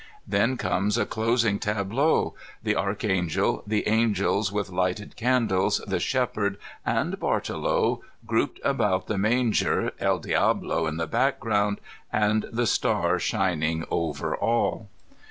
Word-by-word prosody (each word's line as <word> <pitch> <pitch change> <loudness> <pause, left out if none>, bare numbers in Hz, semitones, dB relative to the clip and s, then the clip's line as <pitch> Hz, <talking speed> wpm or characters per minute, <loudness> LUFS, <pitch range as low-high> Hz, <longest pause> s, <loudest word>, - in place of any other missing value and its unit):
Then 130 +3 +1
comes 105 +1 0
a - - +1
closing 115 -2 +1
tableau, 105 +9 +1 0.3
the - - +1
Archangel, 95 -4 0
the 105 0 0
angels 105 -2 +2
with 100 -2 -2
lighted 90 +3 -2
candles, 115 -6 +2
the - - -1
shepherd, 105 -6 0 0.3
and - - -1
Bartolo - - 0 0.2
grouped - - 0
about 95 0 +1
the 105 - -2
manger, 115 +2 +2
JE^ - - +1
DicMo 80 - +1
in 80 - -5
the 80 - -1
background, 105 +4 +1 0.3
and 105 0 +1
the 120 +1 0
star 90 -5 +1
shin 95 -6 0
ing 80 +1 0
over 85 - -1
all. 115 -2 0
105 Hz, 125 wpm, -26 LUFS, 95-115 Hz, 0.3 s, angels